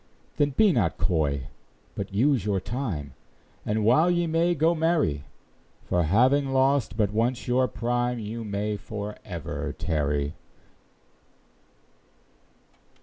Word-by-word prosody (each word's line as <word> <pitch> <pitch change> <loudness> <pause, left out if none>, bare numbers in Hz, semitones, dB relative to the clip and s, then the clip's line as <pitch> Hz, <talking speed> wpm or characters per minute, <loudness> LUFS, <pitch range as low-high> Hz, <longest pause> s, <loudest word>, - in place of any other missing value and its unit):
Then 145 - +3
be 215 -3 +6
not 100 - +1
coy, 70 -6 0 0.4
but 100 0 -5
use 125 +3 +2
your 100 -2 0
time, 95 - -4 0.5
And 105 0 -1
while 155 +10 +5
ye 175 -1 +2
may, 165 +2 +1
go 160 +3 +3
marry; 155 - +1 0.6
For 90 - +1
having 125 - +3
lost 135 -4 +2
but 105 -2 +1
once 120 +3 0
your 125 +1 +3
prime, 120 +1 -1
You 115 +1 -5
may 105 0 -2
for 105 0 -6
ever 75 -5 -5
tarry. 75 -3 -1
110 Hz, 120 wpm, -26 LUFS, 90-135 Hz, 0.6 s, be